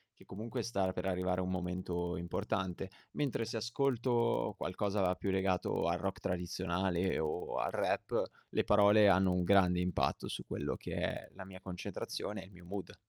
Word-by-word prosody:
che - - -18
comunque 115 +5 -4
star 100 -5 0
per 90 - -3
arrivare 90 -1 0
un 90 - -2
momento 90 -1 -2
importante. 90 +2 -2 0.2
Mentre 135 -5 0
se 115 +1 -3
ascolto 120 0 +1
qualcosa 95 -1 0
più 95 - -2
legato 95 -3 +1
al 85 +1 +2
rock 95 +2 -3
tradizionale 90 +1 0
o 80 +3 -2
al - - 0
rap, - - +1 0.3
le - - +1
parole 105 0 +6
hanno 95 -1 +5
un 90 - +1
grande 90 -1 +5
impatto 90 0 0
su - - -5
quello - - -2
che - - -7
è - - -2
la 95 0 -9
mia 95 -1 -10
concentrazione 95 +2 -4
e - - -12
il 95 - -16
mio 90 -2 -14
mood. 100 +3 -6
95 Hz, 170 wpm, -34 LUFS, 90-100 Hz, 0.3 s, parole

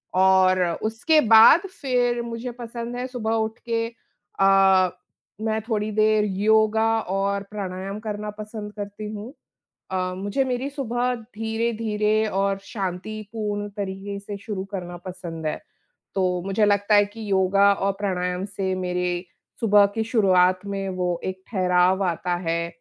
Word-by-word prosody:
और 185 0 +5 0.2
उसके 225 +9 +2
बाद 225 +8 +8 0.2
फिर 245 -3 +1
मुझे 235 +1 -5
पसंद 235 0 -6
है 250 +1 -3
सुबह 235 -3 -2
उठ 220 0 -1
के 230 0 0 0.5
अ, 195 -1 +5 0.5
मैं 220 0 0
थोड़ी 215 -1 0
देर 215 0 +3
योगा 220 +2 +3 0.2
और 200 +1 -1
प्राणायाम 195 0 -5
करना 210 -1 -5
पसंद 210 -1 -7
करती 205 0 -6
हूँ। 215 +6 -7 0.6
अ, 185 -1 -1
मुझे 205 +7 0
मेरी 255 +2 -2
सुबह 250 -3 -1
धीरे-धीरे 220 -1 -1
और 195 0 0
शांतिपूर्ण 205 +1 -4
तरीक़े 200 0 -4
से 200 0 -7
शुरू 200 -1 -5
करना 175 -2 -5
पसंद 175 -3 -7
है, - - -2 0.6
तो 180 -2 +1
मुझे 195 +2 +2
लगता 205 +1 +3
है 205 0 +6
कि 215 +1 -9
योगा 195 +1 +4
और 195 0 0
प्राणायाम 180 -2 -1
से 195 -2 -3
मेरे 180 -1 -2 0.4
सुबह 205 -2 +6
की 225 - 0
शुरुआत 185 -4 +3
में 195 -1 -3
वो 175 -1 -1
एक 185 0 -5
ठहराव 185 -1 +3
आता 175 +1 -1
है। 170 0 0
205 Hz, 140 wpm, -24 LUFS, 190-220 Hz, 0.6 s, बाद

